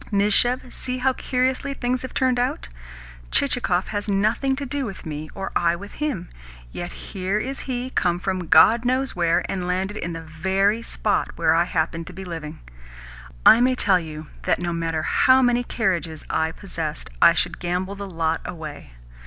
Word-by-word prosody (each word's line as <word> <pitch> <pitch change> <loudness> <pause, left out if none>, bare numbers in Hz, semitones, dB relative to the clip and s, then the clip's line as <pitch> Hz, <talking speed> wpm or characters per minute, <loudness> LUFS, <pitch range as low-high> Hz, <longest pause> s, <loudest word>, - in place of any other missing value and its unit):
Mizhuev, 215 +5 +2
see 255 0 -3
how 260 +1 +2
curiously 260 +2 -1
things 250 0 -1
have 260 - -6
turned 255 -2 +2
out. 245 - -1 0.6
Chichikov 205 -9 +1
has 205 0 -3
nothing 215 +7 +1
to 280 +1 -4
do 280 +1 -2
with 195 -6 -7
me, 155 0 -5
or 195 - -4
I 170 0 +3
with 200 +4 -9
him, 265 - -2 0.4
yet 175 0 -5
here 190 +1 -3
is 265 +5 -3
he 255 0 -3
come 175 -7 +1
from 185 -2 -2
God 220 +10 +6
knows 255 +2 0
where, 170 -1 +2
and 180 -2 -3
landed 190 +3 -1
in 170 -3 -4
the 165 - -5
very 190 +7 +1
spot - - -1
where - - +3
I 170 +1 +3
happen 165 -1 -1
to 180 - -10
be 190 +2 -8
living! 160 -3 -7 0.8
I 230 - +9
may 255 +1 +3
tell 195 -6 +3
you 155 -2 -7 0.2
that, - - +1
no 175 -1 -2
matter 165 -1 -1
how 260 0 +4
many 245 0 +3
carriages 180 -10 -1
I 160 0 +1
possessed, 160 - -5
I - - +8
should - - 0
gamble 180 +2 -2
the 200 0 -7
lot 165 -2 -1
away. 155 - -8
190 Hz, 180 wpm, -23 LUFS, 170-245 Hz, 0.8 s, I